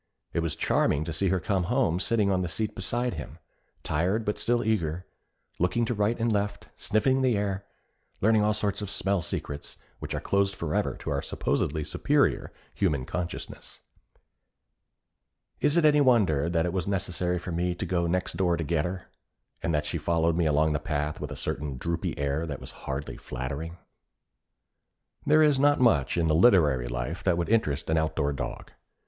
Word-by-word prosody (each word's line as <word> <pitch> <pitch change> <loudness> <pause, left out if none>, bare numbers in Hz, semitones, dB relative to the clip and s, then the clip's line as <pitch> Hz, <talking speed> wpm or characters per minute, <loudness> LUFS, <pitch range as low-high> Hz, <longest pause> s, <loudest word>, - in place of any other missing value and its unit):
It - - +1
was 85 -2 -1
charming 70 - +1
to 80 0 -4
see 95 +5 0
her 95 +1 +2
come 95 0 0
home 85 +1 +1
sitting 105 -1 +1
on 95 -1 +1
the 90 - -1
seat 105 +5 -3
beside 120 +5 -2
him, 75 -3 -7 0.5
tired 95 +8 0
but 105 - -1
still 120 0 +1
eager, 90 -5 -1 0.5
looking 90 +7 +1
to 120 - -1
right 105 +2 0
and 115 0 +1
left, 100 -1 -2
sniffing 130 +5 +1
the 125 -5 +3
air, 100 -1 -2 0.5
learning 110 +1 +4
all 105 0 +2
sorts 105 -1 -1
of 100 - -4
smell 100 -2 0
secrets 75 -3 -5 0.2
which - - -4
are - - -1
closed 100 0 +1
forever 80 -3 -1
to - - -4
our 70 -1 0
supposedly 75 +1 -1
superior - - +1 0.2
human 75 -10 0
consciousness. 90 -1 -6 1.8
Is 145 +3 +2
it 170 - +4
any 150 -1 +5
wonder 95 - +3
that 85 -1 +1
it 90 - -2
was 95 -2 -1
necessary 90 -2 -1
for 90 +1 -6
me 90 +1 -1
to - - -4
go 85 -2 0
next 90 +2 -1
door 90 -3 +1
to 85 - -2
get 80 +1 0
her, 90 +1 -5 0.5
and - - -1
that 75 -1 0
she 85 - -2
followed 80 +1 +1
me 85 -2 +2
along 75 +1 +3
the 75 - 0
path 75 -1 -2
with - - -4
a - - -5
certain 70 -3 -3
droopy 85 +5 -2
air 70 +3 -1
that 70 -3 -5
was - - -9 0.2
hardly 70 +2 -4
flattering? 70 +7 -5 1.5
There 155 +1 +6
is 145 -3 +4
not 145 +1 +4
much 85 - +3
in 85 -1 +2
the 80 - +3
literary 80 - +4
life - - -4
that 90 -3 +2
would 85 - -1
interest 90 -12 +1
an 80 0 +2
outdoor 80 -2 0
dog. 70 - -6
90 Hz, 185 wpm, -27 LUFS, 80-105 Hz, 1.8 s, There